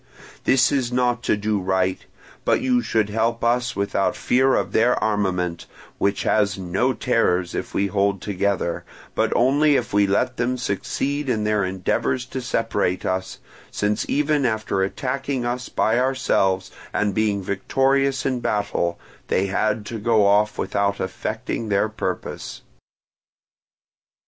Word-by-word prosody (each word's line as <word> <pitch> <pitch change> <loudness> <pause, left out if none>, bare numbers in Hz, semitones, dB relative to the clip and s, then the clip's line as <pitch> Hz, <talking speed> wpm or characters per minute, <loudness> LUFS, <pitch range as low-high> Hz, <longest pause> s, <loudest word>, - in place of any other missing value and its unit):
This 130 -1 +4
is 130 -4 0
not 125 -1 +1
to - - +2
do 105 0 0
right; 95 0 0 0.4
but - - +2
you 255 -1 +2
should 110 - 0
help 115 +2 0
us 125 +1 +1
without 100 -1 0
fear 130 +2 +2
of - - -1
their 120 +3 +3
armament, 95 -5 -1 0.3
which 100 0 +1
has 100 -2 +2
no 95 +8 0
terrors 95 -9 +1
if - - -5
we 100 - +2
hold 100 0 +1
together, 100 -3 -1 0.3
but - - +1
only 145 +4 +4
if 120 -6 -1
we 100 0 +4
let 125 +6 0
them 125 +1 0
succeed 135 +6 -2
in 110 -4 0
their 105 -1 +1
endeavours 115 +7 -1
to 130 0 -5
separate 115 -6 -1
us; 95 0 -2 0.3
since 105 0 -1
even 150 0 +1
after 110 -5 0
attacking 130 +5 -2
us 125 +1 -3
by 110 +2 +1
ourselves 125 -8 +1 0.2
and 105 -1 0
being 105 -2 0
victorious 135 +7 +1
in 130 -2 0
battle, 100 -6 -1 0.3
they 95 - +1
had 105 +2 0
to 115 0 -5
go 110 -1 +3
off 105 +1 +3
without 100 0 0
effecting 105 +3 -3
their 100 +1 +2
purpose. 110 - -5
110 Hz, 145 wpm, -22 LUFS, 100-125 Hz, 0.4 s, This